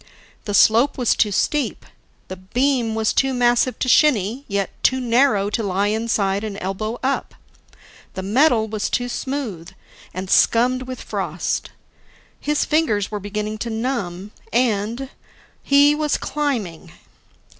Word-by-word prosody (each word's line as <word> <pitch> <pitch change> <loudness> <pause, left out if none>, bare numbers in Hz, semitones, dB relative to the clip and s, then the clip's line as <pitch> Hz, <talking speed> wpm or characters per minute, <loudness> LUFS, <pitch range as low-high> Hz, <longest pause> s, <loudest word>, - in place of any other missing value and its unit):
The 205 - -2
slope 230 +8 +4
was 245 -3 +2
too 210 - +2
steep. 295 +8 -1 0.4
The 185 - -6
beam 235 +4 0
was 220 -1 +1
too 270 -1 +1
massive 245 +1 +2
to - - -2
shinny, 250 -2 +3
yet 200 -2 -2
too 260 - +2
narrow 235 -4 +2
to 230 - -1
lie 200 0 0
inside 210 -2 0
and 210 -2 -5
elbow 215 +5 -4
up. 270 +1 -2 0.8
The 190 - -4
metal 225 +2 +3
was 215 -1 -3
too 245 0 -1
smooth, 240 - -4 0.4
and 185 +1 -6
scummed 250 +6 +3
with 255 -1 -7
frost. - - -3 0.7
His 295 0 0
fingers 225 -12 +1
were 210 - -3
beginning 210 +2 -4
to 235 - -3
numb. 220 -5 -3 0.2
And 235 +2 0 0.5
he 285 +1 +5
was 300 0 0
climbing! 245 - -3
230 Hz, 135 wpm, -21 LUFS, 205-260 Hz, 0.8 s, he